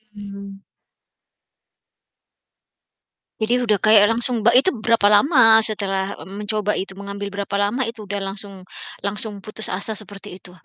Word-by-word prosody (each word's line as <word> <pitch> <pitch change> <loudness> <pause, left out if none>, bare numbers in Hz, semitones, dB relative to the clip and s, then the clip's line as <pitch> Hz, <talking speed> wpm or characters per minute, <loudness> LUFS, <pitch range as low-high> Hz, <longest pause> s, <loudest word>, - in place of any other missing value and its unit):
Hmm. 200 -1 -10 2.8
Jadi, 220 +3 0
udah 215 -4 +1
kayak 215 +1 +5
langsung 235 0 -1
ba 235 - +5
itu 255 +8 +4 0.2
berapa 230 -3 +3
lama 225 0 +5
setelah 200 -3 0 0.2
mencoba 210 +1 -3
itu, 195 - -4
mengambil 200 0 -7
berapa 200 0 -5
lama 210 +5 -1
itu 230 -2 -8
udah 205 0 -5
langsung 195 -1 -8 0.3
langsung 205 +1 -4
putus 215 +2 -3
asa 200 +4 -3
seperti 205 -2 -5
itu? 180 - -12
205 Hz, 130 wpm, -20 LUFS, 200-220 Hz, 2.8 s, kayak